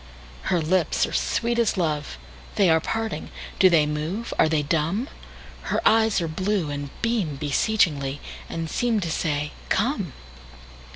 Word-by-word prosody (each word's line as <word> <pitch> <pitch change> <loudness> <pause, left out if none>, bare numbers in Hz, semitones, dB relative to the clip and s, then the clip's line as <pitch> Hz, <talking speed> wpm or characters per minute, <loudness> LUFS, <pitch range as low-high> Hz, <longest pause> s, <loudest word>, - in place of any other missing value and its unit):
Her 180 - +3
lips 170 +2 +2
are - - -7
sweet 235 0 0
as 230 -3 +2
love; 150 - -1 0.4
They 190 -4 +4
are 160 - +5
parting! 220 -1 -3 0.3
Do 190 - +7
they 160 -4 +4
move? 155 +10 -3
Are 160 - +5
they 155 -2 +1
dumb? 165 - 0 0.6
Her - - +1
eyes 220 -2 +4
are 165 - -1
blue, 185 0 -1
and 145 0 -4
beamBeseechingly, 150 - +1 0.3
and 165 -1 -3
seemTo 215 -3 0
say, 150 -2 -1 0.2
"Come!" - - 0
165 Hz, 135 wpm, -24 LUFS, 150-210 Hz, 0.6 s, Do